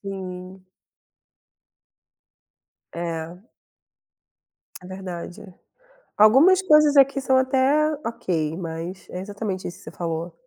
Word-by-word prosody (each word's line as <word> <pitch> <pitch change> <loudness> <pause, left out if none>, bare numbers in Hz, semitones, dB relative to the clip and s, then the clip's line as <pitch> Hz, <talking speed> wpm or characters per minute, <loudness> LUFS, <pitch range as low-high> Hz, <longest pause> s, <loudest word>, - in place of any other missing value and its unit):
Sim. 185 -1 -8 2.3
É. 170 +3 -6 1.4
É - - -12
verdade. 185 +1 -8 0.8
Algumas 275 - +6
coisas 300 -4 +4
aqui 275 0 +4
são 260 -1 +2
até 270 +4 +2
ok, 165 -8 -2
mas 170 +2 -7
é 180 - -5
exatamente 200 -1 -5
isso 175 - -8
que - - -18
você 155 - -10
falou. 165 0 -5
190 Hz, 95 wpm, -23 LUFS, 175-260 Hz, 2.3 s, Algumas